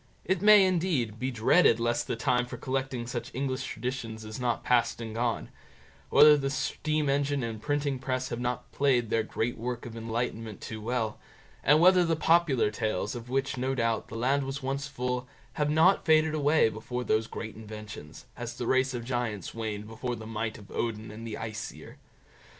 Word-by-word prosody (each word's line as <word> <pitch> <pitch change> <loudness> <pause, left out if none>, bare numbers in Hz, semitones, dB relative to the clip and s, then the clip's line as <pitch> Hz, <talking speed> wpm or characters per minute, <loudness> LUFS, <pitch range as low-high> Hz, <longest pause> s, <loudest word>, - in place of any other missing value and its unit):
It 190 -1 0
may, 210 -1 +8
indeed, 165 - 0
be 130 - -1
dreaded 120 +2 +4
lest 120 0 0
the - - -1
time 125 0 +1
for 125 - -7
collecting 130 -1 -2
such 120 0 -4
English 135 0 -2
traditions 115 -2 -5
is 110 +2 -7
not 120 -2 -1
past 120 -2 +2
and 115 -2 -5
gone; 115 0 -1 0.6
whether 150 0 +8
the 135 -1 -1
steam 155 +1 -1
engine 140 0 +1
and 110 -2 -4
printing 145 0 -1
press 130 -1 -2
have 120 - -4
not 125 0 -3
played 125 -5 +2
their 115 - +3
great 115 +1 -3
work 120 0 -4
of 115 -1 -8
enlightenment 115 -2 -3
too 110 -1 -7
well; 115 -1 -2 0.4
and 150 +2 +5
whether 180 +1 +6
the 165 -1 +1
popular 160 -8 +3
tales, 110 -2 -2
of 120 -1 -8
which, 135 +1 -1
no 130 +2 -1
doubt, 115 -2 0
the - - -9
land 130 +5 +1
was 135 +1 -5
once 135 +1 -2
full, 125 -2 -3 0.3
have 150 -1 0
not 160 +6 +4
faded 155 -1 +4
away 150 -2 +4
before 115 +3 -4
those 110 -1 +1
great 110 -1 -6
inventions, 105 -7 -9
as 120 0 -6
the 120 - -4
race 130 +1 +2
of 120 -1 -5
Giants 120 -6 -3
waned 110 -2 -4
before 120 +2 -4
the 110 -1 -9
might 110 0 -3
of 105 -1 -14
Odin 110 -2 -3
and 115 +2 -8
the 110 - -4
Aesir. 110 -1 -7
125 Hz, 190 wpm, -29 LUFS, 115-140 Hz, 0.6 s, may